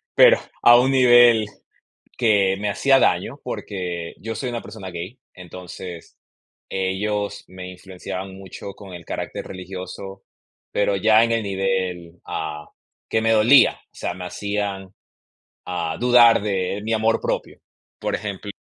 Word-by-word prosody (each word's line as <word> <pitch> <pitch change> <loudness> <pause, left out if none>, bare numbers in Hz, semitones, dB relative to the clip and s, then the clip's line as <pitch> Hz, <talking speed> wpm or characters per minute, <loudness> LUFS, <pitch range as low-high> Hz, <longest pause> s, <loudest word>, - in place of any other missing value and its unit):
Pero, - - +7 0.2
a 120 0 +9
un 130 +2 +2
nivel 120 -3 +6 0.7
que 100 -5 +3
me 105 0 -1
hacía 135 +7 +3
daño, - - +1
porque 90 -4 -5
yo 115 +2 -4
soy 125 +4 -3
una 120 -1 -4
persona 105 -3 -9
gay, 90 +9 -7
entonces 90 -1 -10 0.5
ellos 100 +2 -2
me 90 0 -9
influenciaban 95 +1 -7
mucho 95 +1 -9
con 100 -1 -12
el 85 -1 -10
carácter - - -5
religioso, 95 +1 -8 0.5
pero 100 -1 +1
ya 110 +3 +5
en 115 - -2
el 115 -1 0
nivel, 95 -3 -2
ah, 75 -1 -5 0.4
que 110 - +1
me 115 0 +2
dolía, 115 +5 +6
o - - -24
sea, - - -4
me 90 0 -8
hacían, 100 0 -4 0.7
ah, 85 -3 -3
dudar 120 -1 +6
de 95 -1 -1
mi 110 - -2
amor 110 +1 +1
propio. - - -3 0.4
Por - - -2
ejemplo 100 -1 -5
100 Hz, 140 wpm, -22 LUFS, 90-110 Hz, 0.7 s, a